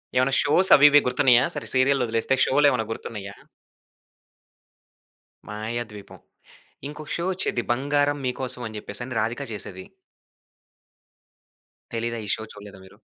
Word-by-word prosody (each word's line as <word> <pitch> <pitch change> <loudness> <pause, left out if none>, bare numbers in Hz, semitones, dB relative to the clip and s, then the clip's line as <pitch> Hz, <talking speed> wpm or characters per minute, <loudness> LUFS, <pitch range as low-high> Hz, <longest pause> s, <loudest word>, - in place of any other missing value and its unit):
ఏమన్నా 130 +1 +2
షోస్, 180 +6 +4
అవి 145 - +6
ఇవి 145 0 +6
గుర్తున్నాయా? 125 -1 +4
సరే - - -5
సీరియల్లొదిలేస్తే 130 -2 +1
షోలెమన్నా 135 -5 +2
గుర్తున్నాయా? 100 -3 -7 2.1
'మాయాద్వీపం' 110 -1 -7 0.7
ఇంకొక 150 0 -9
షో 170 - -3
వచ్చేది, 175 -10 -2
'బంగారం 145 +3 0
మీకోసం' 125 -1 -3
అని 110 -1 -8
చెప్పేసి 105 +4 -5
అని 125 -3 -5
రాధిక 115 +6 -2
చేసేది. 95 -3 -7 2.1
తెలీదా? 115 +1 -3
ఈ - - -9
షో 110 - -8
చూడలేదా 100 -2 -12
మీరు? - - -18
125 Hz, 115 wpm, -24 LUFS, 110-140 Hz, 2.1 s, అవి